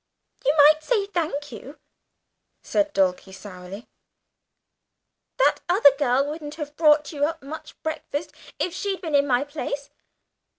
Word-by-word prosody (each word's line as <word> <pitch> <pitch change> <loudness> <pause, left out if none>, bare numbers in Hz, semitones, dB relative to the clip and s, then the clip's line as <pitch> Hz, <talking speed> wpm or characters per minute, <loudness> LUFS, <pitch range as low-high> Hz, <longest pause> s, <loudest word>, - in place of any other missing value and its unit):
"You - - +4
might 305 +1 +7
say 420 +1 +1
'thank 320 -7 -3
you,'" 260 +6 -10 0.9
said 305 -1 0
Dulcie, 190 -3 0
pouting. 190 +2 -10 1.5
"That - - +3
other 290 -7 +6
girl 270 -1 +2
wouldn't 295 0 -6
have 295 -2 -7
brought 300 -2 +4
you 290 -3 -3
up 320 -1 -4
much 300 +3 -9
breakfast 315 -1 -4 0.2
if 355 - -2
she'd 390 0 -3
been 320 -5 -5
in 285 0 +4
my 250 0 +2
place. 285 -1 -5
295 Hz, 135 wpm, -24 LUFS, 275-320 Hz, 1.5 s, might